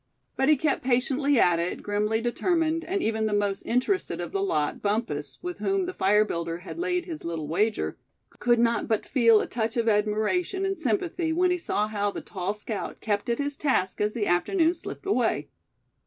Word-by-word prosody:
But 265 +2 +2
he 305 - +7
kept 295 +2 0
patiently 265 +2 +2
at 175 -2 +4
it, 170 +1 -3
grimly 210 +2 0
determined; 325 +6 0
and 385 +2 -2
even 220 0 0
the 210 - 0
most 205 -1 0
interested 255 - 0
of - - -4
the 395 - -1
lot, 150 - 0
Bumpus, 205 -9 -2
with 355 0 -5
whom 390 -1 0
the 365 - -4
fire 210 - +3
builder 170 -3 -3
had 185 - -9
laid 360 -1 0
his 330 -4 -7
little 165 -3 -4
wager, 205 +7 0 0.4
could 240 0 +3
not 230 -1 +2
but 220 -2 0
feel 230 -5 +5
a - - -2
touch 225 0 -2
of 230 -1 +1
admiration 220 - +1
and 390 0 0
sympathy 320 - -1
when 360 +2 +2
he 360 - 0
saw 210 -9 0
how 205 -1 -1
the - - -5
tall 190 +1 -4
scout 210 0 -5
kept 205 +1 -1
at 235 - +1
his 285 0 -2
task 190 -11 0
as 210 +2 0
the 220 -3 0
afternoon 320 - +2
slipped 345 - -8
away. 250 - 0
230 Hz, 200 wpm, -26 LUFS, 205-325 Hz, 0.4 s, he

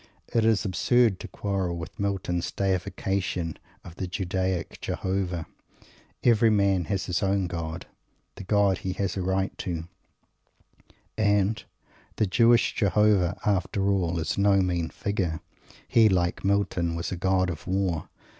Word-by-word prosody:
It 115 - +3
is 110 -2 +2
absurd 110 +2 +2
to - - -7
quarrel 95 -4 -2
with 85 -1 -8
Milton's 90 -3 -1
deification 95 -2 -2 0.3
of 85 - -12
the 95 - -3
Judaic 95 -1 -2
Jehovah. 95 -3 -2 0.8
Every 115 -1 +5
man 100 -4 +2
has 95 +3 -2
his 90 -1 -1
own 100 -1 +1
God. 85 0 -5 0.5
The - - -9
God 100 -1 +2
he 95 - -3
has 95 0 -2
a 95 - -2
right 95 +1 -1
to. 85 -2 -4 1.3
And 105 0 +2 0.5
the 110 - +2
Jewish 115 +5 +4
Jehovah, 100 -4 +2
after 100 0 +1
all, 90 -3 0
is 80 +3 -2
no 100 0 +4
mean 85 -3 -1
figure. 90 -5 -2 0.5
He, 110 -2 +5
like 90 -2 0
Milton, 95 -4 +1
was 85 - -3
a - - -1
God 95 0 +1
of 80 - -8
War. 95 -4 -1
95 Hz, 140 wpm, -26 LUFS, 90-100 Hz, 1.3 s, Every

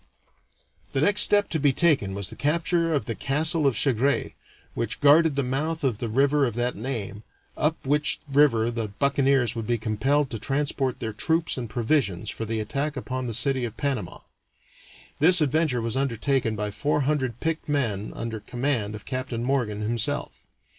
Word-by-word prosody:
The 135 - +1
next 205 +6 +4
step 205 0 +5
to 160 - -1
be 145 -1 +3
taken 135 - +2
was 100 -1 -4
the - - -9
capture 165 +2 0
of 145 -3 0
the 115 - -3
castle 155 +5 +1
of 125 -6 +1
Chagres, 135 +1 +1 0.4
which - - -3
guarded 150 +1 +5
the 140 - 0
mouth 155 +6 -2
of 120 -6 0
the 115 - -3
river 140 +5 +2
of 120 -5 0
that 120 +1 -1
name, 105 -3 -5 0.3
up 155 +2 0
which 150 +2 +1
river 135 -5 +3
the 115 -2 -3
buccaneers 135 +1 +1
would 115 -2 -4
be 120 - +1
compelled 125 +6 0
to 115 - -4
transport 135 0 -1
their 110 -2 -3
troops 160 +9 0
and 120 -3 -5
provisions 115 - 0
for 115 - -5
the 110 0 -2
attack 140 +6 -2
upon 130 0 -4
the 115 - -3
city 130 +2 +1
of 115 -2 -5
Panama. 140 -3 -3 1.0
This 175 +4 +7
adventure 150 -4 +1
was 115 +1 -2
undertaken 130 -2 0
by 105 0 -3
four 145 +7 0
hundred 130 -4 -1
picked 160 -1 -3
men 115 -9 -1
under 115 -1 -4
command 120 -1 -2
of 105 - -10
Captain 130 -3 -4
Morgan 120 -6 -1
himself. 110 +1 -3
130 Hz, 175 wpm, -25 LUFS, 115-145 Hz, 1.0 s, This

